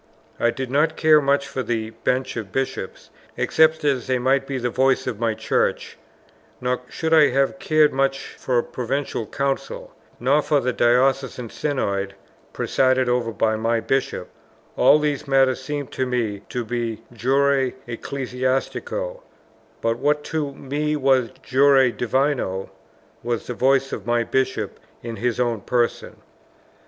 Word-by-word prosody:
I 120 Hz, -, +3 dB
did 130 Hz, +1 st, -4 dB
not 150 Hz, +3 st, +2 dB
care 155 Hz, -1 st, +5 dB
much 140 Hz, 0 st, +1 dB
for 140 Hz, -1 st, -3 dB
the 115 Hz, -3 st, -2 dB
Bench 125 Hz, +3 st, -1 dB
of 110 Hz, -5 st, -5 dB
Bishops, 135 Hz, -7 st, -4 dB, 0.3 s
except 160 Hz, 0 st, +3 dB
as 135 Hz, -3 st, +1 dB
they 130 Hz, -1 st, +1 dB
might 135 Hz, +2 st, +1 dB
be 135 Hz, -, -2 dB
the 125 Hz, -1 st, -2 dB
voice 130 Hz, +1 st, +2 dB
of 120 Hz, -5 st, -4 dB
my 115 Hz, -2 st, 0 dB
Church: 110 Hz, -, -1 dB, 0.6 s
nor 125 Hz, 0 st, -1 dB
should 160 Hz, 0 st, -2 dB
I 155 Hz, -2 st, +7 dB
have 135 Hz, +1 st, +1 dB
cared 155 Hz, +1 st, +3 dB
much 135 Hz, 0 st, 0 dB
for 125 Hz, -2 st, -1 dB
a 120 Hz, -, +2 dB
Provincial 125 Hz, -2 st, -3 dB
Council; 135 Hz, +2 st, -3 dB, 0.3 s
nor 135 Hz, +5 st, +3 dB
for 150 Hz, 0 st, +1 dB
a 125 Hz, -, +1 dB
Diocesan 125 Hz, 0 st, +1 dB
Synod 100 Hz, -9 st, -2 dB, 0.4 s
presided 130 Hz, -1 st, +1 dB
over 120 Hz, -2 st, 0 dB
by 110 Hz, +1 st, +1 dB
my 115 Hz, +1 st, 0 dB
Bishop; 135 Hz, +3 st, -1 dB, 0.5 s
all -, -, +6 dB
these 150 Hz, -2 st, -2 dB
matters 135 Hz, -2 st, +3 dB
seemed 145 Hz, +1 st, -4 dB
to 130 Hz, -, -2 dB
me 115 Hz, -5 st, -1 dB
to 120 Hz, -2 st, -3 dB
be 115 Hz, -1 st, -3 dB
jure 135 Hz, +2 st, +2 dB, 0.2 s
ecclesiastico, 135 Hz, -, -3 dB, 0.6 s
but 115 Hz, +1 st, 0 dB
what 150 Hz, +2 st, +1 dB
to 150 Hz, -3 st, -2 dB
me 150 Hz, +3 st, -2 dB
was 130 Hz, -4 st, +2 dB
jure 135 Hz, -1 st, +4 dB
divino 125 Hz, -6 st, -1 dB, 0.5 s
was 120 Hz, -1 st, -2 dB
the 125 Hz, -, -4 dB
voice 135 Hz, +2 st, +2 dB
of -, -, -6 dB
my 120 Hz, 0 st, +2 dB
Bishop 130 Hz, -5 st, -1 dB, 0.2 s
in 115 Hz, -1 st, -5 dB
his 120 Hz, 0 st, -1 dB
own 120 Hz, -4 st, 0 dB
person. 120 Hz, +3 st, -1 dB
130 Hz, 150 wpm, -22 LUFS, 120-140 Hz, 0.6 s, I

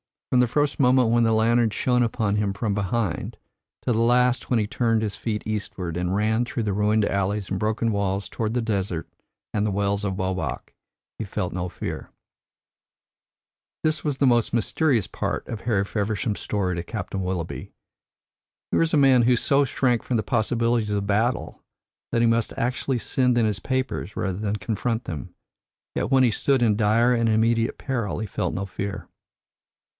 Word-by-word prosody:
From 125 Hz, -, +4 dB
the 125 Hz, -, +4 dB
first 145 Hz, +5 st, 0 dB
moment 125 Hz, -3 st, +4 dB
when 120 Hz, +1 st, +3 dB
the 115 Hz, -1 st, +3 dB
lantern 115 Hz, +1 st, +3 dB
shone 125 Hz, +3 st, +1 dB
upon 110 Hz, -3 st, 0 dB
him 105 Hz, -2 st, 0 dB
from 100 Hz, +1 st, -1 dB
behind, 100 Hz, -1 st, -2 dB, 0.5 s
to -, -, +1 dB
the 115 Hz, -, +1 dB
last 125 Hz, +1 st, +3 dB
when 125 Hz, -, +3 dB
he 110 Hz, -, +1 dB
turned 115 Hz, +1 st, +1 dB
his 100 Hz, -2 st, -3 dB
feet 105 Hz, -2 st, -3 dB
eastward, 95 Hz, -5 st, -4 dB
and 90 Hz, +1 st, -1 dB
ran 110 Hz, +3 st, +1 dB
through 120 Hz, -, -3 dB
the 105 Hz, -2 st, -1 dB
ruined 105 Hz, +2 st, +2 dB
alleys 100 Hz, 0 st, -1 dB
and 95 Hz, -, -1 dB
broken 110 Hz, +1 st, 0 dB
walls 100 Hz, -1 st, -1 dB
toward 110 Hz, -1 st, -2 dB
the 125 Hz, -, +1 dB
desert 95 Hz, -6 st, -2 dB, 0.5 s
and 105 Hz, -, +1 dB
the -, -, +1 dB
Wells 100 Hz, +1 st, 0 dB
of 95 Hz, 0 st, -2 dB
Obak, 95 Hz, 0 st, -3 dB, 0.5 s
he 110 Hz, -, -3 dB
felt 90 Hz, -2 st, -3 dB
no 90 Hz, 0 st, -2 dB
fear." -, -, -6 dB, 1.7 s
This 155 Hz, 0 st, 0 dB
was 145 Hz, -3 st, -1 dB
the 140 Hz, -, +2 dB
most 120 Hz, -4 st, +3 dB
mysterious 120 Hz, -, +1 dB
part -, -, -3 dB
of 110 Hz, -, -5 dB
Harry 110 Hz, -5 st, +1 dB
Feversham's 105 Hz, 0 st, -2 dB
story 95 Hz, -4 st, -1 dB
to -, -, -1 dB
Captain 100 Hz, +1 st, -5 dB
Willoughby. 90 Hz, -3 st, -4 dB, 1.0 s
Here -, -, +2 dB
was 165 Hz, -1 st, +2 dB
a -, -, +4 dB
man 135 Hz, -3 st, +5 dB
who 125 Hz, +1 st, +4 dB
so 140 Hz, +4 st, +2 dB
shrank 125 Hz, -2 st, +1 dB
from 125 Hz, -, -1 dB
the 110 Hz, -, 0 dB
possibilities 115 Hz, 0 st, +1 dB
of 100 Hz, -1 st, -1 dB
battle, 110 Hz, +5 st, 0 dB, 0.5 s
that 115 Hz, -, +3 dB
he 120 Hz, -, +4 dB
must 115 Hz, -1 st, +1 dB
actually 125 Hz, +1 st, -1 dB
send 125 Hz, +1 st, +1 dB
in 115 Hz, -, +3 dB
his 105 Hz, -2 st, 0 dB
papers 130 Hz, -5 st, -2 dB
rather 95 Hz, 0 st, -2 dB
than 105 Hz, -1 st, -1 dB
confront 110 Hz, +4 st, -2 dB
them; 75 Hz, -7 st, -7 dB, 0.6 s
yet -, -, -1 dB
when 135 Hz, -1 st, +5 dB
he 120 Hz, -, +4 dB
stood 130 Hz, +4 st, +2 dB
in 105 Hz, -3 st, +3 dB
dire 115 Hz, +3 st, +3 dB
and 115 Hz, -1 st, +2 dB
immediate 115 Hz, +1 st, +2 dB
peril 120 Hz, -7 st, -2 dB
he 110 Hz, -, -2 dB
felt 100 Hz, -, -2 dB
no 95 Hz, -, -2 dB
fear. 100 Hz, +1 st, -5 dB
110 Hz, 185 wpm, -24 LUFS, 100-120 Hz, 1.7 s, man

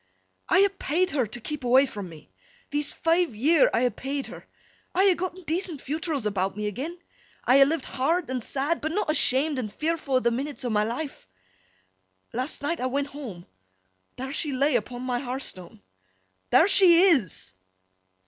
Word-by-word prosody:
'I -, -, +5 dB
ha' 395 Hz, 0 st, +2 dB
paid 360 Hz, +6 st, 0 dB
her 260 Hz, -6 st, 0 dB
to 230 Hz, +4 st, -6 dB
keep 300 Hz, +3 st, -6 dB
awa' 255 Hz, +3 st, +5 dB
fra' 210 Hz, -6 st, -7 dB
me. 160 Hz, -, -11 dB, 0.4 s
These 290 Hz, 0 st, -1 dB
five 330 Hz, -6 st, +1 dB
year 295 Hz, +7 st, +4 dB
I 235 Hz, -, +1 dB
ha' 230 Hz, -, -5 dB
paid 275 Hz, +1 st, -4 dB
her. -, -, -11 dB, 0.5 s
I 380 Hz, +2 st, +4 dB
ha' -, -, +1 dB
gotten 370 Hz, +1 st, -5 dB
decent 330 Hz, -1 st, -2 dB
fewtrils 300 Hz, -3 st, -3 dB
about 195 Hz, -1 st, -1 dB
me 210 Hz, -, -3 dB
agen. 275 Hz, -, -4 dB, 0.5 s
I 260 Hz, +3 st, +5 dB
ha' 275 Hz, -, +7 dB
lived 315 Hz, -2 st, -1 dB
hard 320 Hz, +6 st, 0 dB
and 255 Hz, -3 st, -2 dB
sad, 285 Hz, +7 st, -2 dB
but 315 Hz, -, -2 dB
not 405 Hz, -5 st, 0 dB
ashamed 285 Hz, -1 st, +2 dB
and 215 Hz, -5 st, -4 dB
fearfo' 305 Hz, 0 st, -1 dB
a' -, -, +3 dB
the 235 Hz, -1 st, +1 dB
minnits 260 Hz, +1 st, -4 dB
o' 245 Hz, -, -1 dB
my 210 Hz, -1 st, +2 dB
life. 250 Hz, -, -5 dB, 1.1 s
Last 255 Hz, +4 st, -3 dB
night, 330 Hz, +4 st, -1 dB
I 255 Hz, -, 0 dB
went 280 Hz, +2 st, -2 dB
home. 230 Hz, -13 st, -8 dB, 0.7 s
There 265 Hz, +2 st, -5 dB
she 295 Hz, -2 st, -2 dB
lay 275 Hz, +1 st, +2 dB
upon 245 Hz, +2 st, -2 dB
my 250 Hz, -1 st, -1 dB
har 255 Hz, 0 st, -4 dB
stone! 180 Hz, -, -8 dB, 0.7 s
There 340 Hz, -, +6 dB
she 370 Hz, -3 st, +6 dB
is! 265 Hz, -, +2 dB
275 Hz, 185 wpm, -26 LUFS, 245-320 Hz, 1.1 s, ha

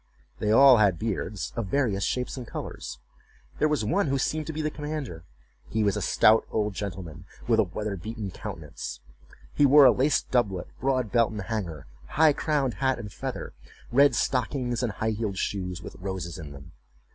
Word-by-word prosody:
They 105 Hz, -, -1 dB
all 135 Hz, +2 st, +8 dB
had 100 Hz, -5 st, +3 dB
beards, 105 Hz, -3 st, -3 dB
of 115 Hz, -4 st, -2 dB
various 105 Hz, -5 st, 0 dB
shapes 125 Hz, +4 st, -1 dB
and 125 Hz, -3 st, -7 dB
colors. -, -, -6 dB, 0.6 s
There 155 Hz, -, +4 dB
was 150 Hz, -8 st, 0 dB
one 180 Hz, -, +1 dB
who 135 Hz, 0 st, +1 dB
seemed 155 Hz, +3 st, -1 dB
to -, -, -2 dB
be 155 Hz, 0 st, -4 dB
the 155 Hz, -, -1 dB
commander. 150 Hz, -, -5 dB, 0.4 s
He 110 Hz, 0 st, 0 dB
was 100 Hz, -2 st, +2 dB
a -, -, -2 dB
stout 110 Hz, +1 st, +4 dB
old 105 Hz, -1 st, -1 dB
gentleman, 90 Hz, -3 st, -6 dB, 0.2 s
with 115 Hz, -2 st, +3 dB
a -, -, +6 dB
weather 100 Hz, +3 st, -4 dB
beaten 105 Hz, +2 st, -6 dB
countenance; -, -, -7 dB, 0.5 s
he 145 Hz, -, +2 dB
wore 145 Hz, +1 st, +8 dB
a 125 Hz, -, +9 dB
laced 135 Hz, +4 st, +1 dB
doublet, 100 Hz, -8 st, +1 dB
broad 130 Hz, -4 st, 0 dB
belt 115 Hz, -2 st, +3 dB
and 105 Hz, -2 st, -5 dB
hanger, 95 Hz, -9 st, -4 dB, 0.3 s
high 155 Hz, -1 st, +6 dB
crowned 140 Hz, -5 st, 0 dB
hat 130 Hz, -1 st, +2 dB
and 105 Hz, -1 st, -8 dB
feather, -, -, -5 dB, 0.4 s
red 140 Hz, +3 st, +5 dB
stockings, 125 Hz, -1 st, 0 dB
and 120 Hz, -4 st, -1 dB
high 110 Hz, +1 st, -1 dB
heeled 105 Hz, -3 st, -3 dB
shoes, 90 Hz, -3 st, -3 dB
with -, -, -9 dB
roses 95 Hz, -2 st, -5 dB
in 75 Hz, -3 st, -8 dB
them. 70 Hz, +3 st, -12 dB
110 Hz, 185 wpm, -27 LUFS, 95-135 Hz, 0.6 s, a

